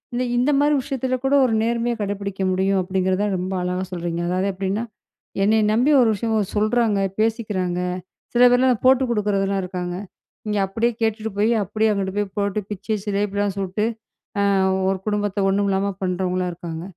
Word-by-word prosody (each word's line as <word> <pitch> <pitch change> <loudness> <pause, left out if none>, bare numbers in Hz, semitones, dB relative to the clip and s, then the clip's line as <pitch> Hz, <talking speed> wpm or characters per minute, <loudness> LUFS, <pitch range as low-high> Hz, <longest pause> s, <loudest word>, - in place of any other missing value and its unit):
இந் 245 - 0 0.2
இந்த 250 +4 +3
மாரி 295 +1 +3
விஷயத்துல 260 -1 -2
கூட 270 +1 +1
ஒரு 235 - 0
நேர்மைய 235 +1 0
கடைபிடிக்க 200 -1 -3
முடியும் 190 +1 +1
அப்டிங்கிறதான் 190 +2 0
ரொம்ப 185 +1 -3
அழகா 180 +1 -2
சொல்றீங்க. 170 -1 -3
அதாவது 185 +2 0
எப்டின்னா, 195 +3 -2 0.6
"என்னைய 215 +2 +3
நம்பி 250 +7 +3
ஒரு 240 - +4
விஷயம் 215 -1 0
சொல்றாங்க, 215 0 +2 0.2
பேசிக்கிறாங்க" 210 -5 0 0.5
சில 240 - +3
பேர்லாம் 250 -2 +3
போட்டு 260 0 +5
குடுக்குறதலாம் 200 -3 0
இருக்காங்க. 180 -1 -4 0.5
இங்க 210 0 0
அப்டியே 225 +5 0
கேட்டுட்டு 220 0 -1
போய் 215 +3 +3
அப்டியே 215 +3 0
அங்கிட்டு 195 -1 -2
போய் 205 0 0
போட்டு 200 +1 0
பிச்சு 205 +1 -3
சிலேப்பிலாம் 205 -1 -1
சுட்டு, 195 +2 -1 0.5
ஆ - - +3 0.5
ஒரு 195 - 0
குடும்பத்த 205 -1 -1
ஒண்ணும் 200 +1 +1
இல்லாம 195 +1 0
பண்றவங்களாம் 185 0 -1
இருக்காங்க. 165 -1 -7
205 Hz, 155 wpm, -22 LUFS, 190-220 Hz, 0.6 s, போட்டு